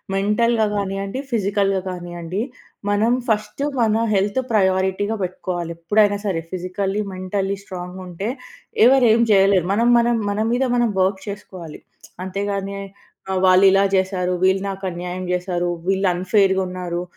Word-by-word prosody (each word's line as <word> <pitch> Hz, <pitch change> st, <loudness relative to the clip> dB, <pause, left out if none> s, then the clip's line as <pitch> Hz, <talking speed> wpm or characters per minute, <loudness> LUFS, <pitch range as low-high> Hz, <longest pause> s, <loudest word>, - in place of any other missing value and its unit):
మెంటల్‌గా 215 Hz, +3 st, +2 dB
కానియ్యండి. 195 Hz, +3 st, -3 dB
ఫిజికల్‌గా 200 Hz, -3 st, +1 dB
కానియ్యండి. 175 Hz, +1 st, -5 dB, 0.5 s
మనం 215 Hz, +4 st, +2 dB, 0.2 s
ఫస్టు 215 Hz, +4 st, -1 dB, 0.2 s
మన 220 Hz, -2 st, +3 dB, 0.2 s
హెల్త్ 200 Hz, +5 st, +1 dB
ప్రయారిటీగా 190 Hz, +1 st, +1 dB
పెట్టుకోవాలి 175 Hz, -2 st, -4 dB
ఎప్పుడైనా 205 Hz, +4 st, +2 dB
సరే. 180 Hz, -5 st, -1 dB
ఫిజికల్లి, 190 Hz, +3 st, -2 dB
మెంటల్లి 190 Hz, +1 st, -2 dB
స్ట్రాంగ్‌గా 180 Hz, -1 st, -8 dB
ఉంటే 180 Hz, +5 st, -4 dB, 0.6 s
ఎవరు 260 Hz, 0 st, +6 dB
ఏమి 235 Hz, +1 st, +3 dB
చేయలేరు. 195 Hz, -3 st, +4 dB
మనం, 230 Hz, +4 st, +2 dB
మనం 235 Hz, 0 st, +2 dB
మన 205 Hz, +1 st, -2 dB
మీద 245 Hz, +2 st, +1 dB
మనం 240 Hz, -1 st, +2 dB
వర్క్ 190 Hz, +1 st, +1 dB
చేసుకోవాలి. 185 Hz, -6 st, -9 dB, 0.5 s
అంతేగాని 200 Hz, +1 st, -3 dB, 0.6 s
ఆహ్, 190 Hz, -, 0 dB
వాళ్ళు 185 Hz, +1 st, +6 dB
ఇలా 195 Hz, +1 st, +4 dB
చేశారు. 185 Hz, -1 st, 0 dB
వీళ్ళు 190 Hz, +1 st, +3 dB
నాకు 195 Hz, 0 st, -7 dB
అన్యాయం 180 Hz, +1 st, -5 dB
చేశారు. 180 Hz, -1 st, -1 dB, 0.2 s
వీళ్ళు 195 Hz, 0 st, +2 dB
అన్‌ఫెయిర్‌గా 190 Hz, +1 st, +2 dB
ఉన్నారు. 180 Hz, -1 st, -4 dB
195 Hz, 135 wpm, -21 LUFS, 185-205 Hz, 0.6 s, ఎవరు